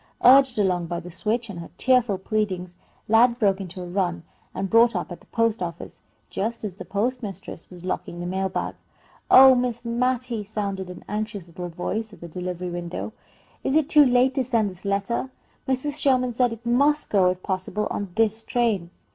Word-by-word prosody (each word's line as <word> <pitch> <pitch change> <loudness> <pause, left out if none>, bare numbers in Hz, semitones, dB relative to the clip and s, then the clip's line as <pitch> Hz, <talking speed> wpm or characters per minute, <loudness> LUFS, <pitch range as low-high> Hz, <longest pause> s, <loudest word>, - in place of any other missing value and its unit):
Urged 265 -1 +7
along 180 -4 +1
by 170 0 -3
the 175 +1 -10
switch 225 +6 -1
and 195 -5 -7
her 170 - -8
tearful 250 -6 +3
pleadings, 190 -3 -2 0.3
Lad 235 +2 +5
broke 200 -4 +2
into 185 0 -7
a - - -7
run 175 -2 -1 0.3
and 195 - -2
brought 230 +2 +5
up 180 - -3
at 175 - -7
the - - -23
post 230 -3 0
office, 170 -1 -6 0.3
just 225 +3 -3
as 205 -3 -4
the 190 - -9
postmistress 205 -5 -4
was 180 -1 -11
locking 175 -1 -4
the 175 - -4
mail 190 +2 -1
bag. - - -3 0.6
"Oh, 265 0 +9
Miss 245 -2 -1
Mattie!" 240 -1 -1
sounded 200 -3 -4
an 180 - -10
anxious 210 -3 -4
little 175 +1 -7
voice 215 +6 -4
at - - -14
the 170 - -8
delivery 180 +1 -4
window, 175 +4 -5 0.5
"is 270 - 0
it 310 -1 +3
too 300 -2 +7
late 255 0 +3
to 265 - +1
send 230 -5 +1
this 185 +2 -15
letter? 200 +6 -1 0.4
Mrs. 280 +3 -1
Sherman 255 -3 +2
said 245 0 +2
it 230 0 -9
must 285 +5 +2
go, 190 -3 +4
if 185 0 -4
possible, 190 +2 -2
on 200 -2 -3
this 225 0 +2
train." 220 -7 0
210 Hz, 190 wpm, -24 LUFS, 185-245 Hz, 0.6 s, Oh